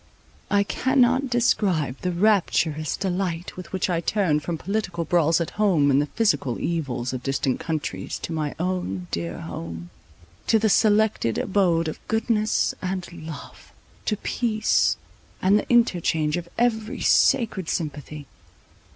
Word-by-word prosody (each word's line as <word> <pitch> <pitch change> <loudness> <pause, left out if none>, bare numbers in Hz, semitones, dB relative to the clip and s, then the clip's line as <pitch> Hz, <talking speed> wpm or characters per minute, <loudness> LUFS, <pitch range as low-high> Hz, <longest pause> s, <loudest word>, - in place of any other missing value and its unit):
I 200 0 +3
cannot 260 +3 +2
describe 195 - +1
the 180 - -1
rapturous 170 -5 +1
delight 180 -3 -2
with 185 - -9
which 190 - -1
I 170 -3 0
turned 170 -6 +1
from 165 +2 -3
political 185 -3 -2
brawls 165 0 +3
at 170 - -2
home, 160 -9 +4
and 135 +1 +4
the 145 - -2
physical 200 - 0
evils 130 -7 -2
of 130 - -4
distant 135 -1 -1
countries, 160 -2 -3
to 165 - -4
my 155 -2 -2
own 175 - -2
dear 85 0 -4
home, 85 +1 -7 0.6
to 225 - +5
the 220 0 +2
selected 210 - +3
abode 180 -5 +1
of 155 - -5
goodness 220 -1 +1
and 185 -1 -3
love; 160 -3 -10 0.3
to 210 - 0
peace, 215 -1 +1 0.4
and 200 +3 +4
the - - -7
interchange 175 -10 +2
of 175 -1 -5
every 230 +1 0
sacred 220 -9 +3
sympathy. 150 -2 -4
175 Hz, 140 wpm, -24 LUFS, 150-210 Hz, 0.6 s, to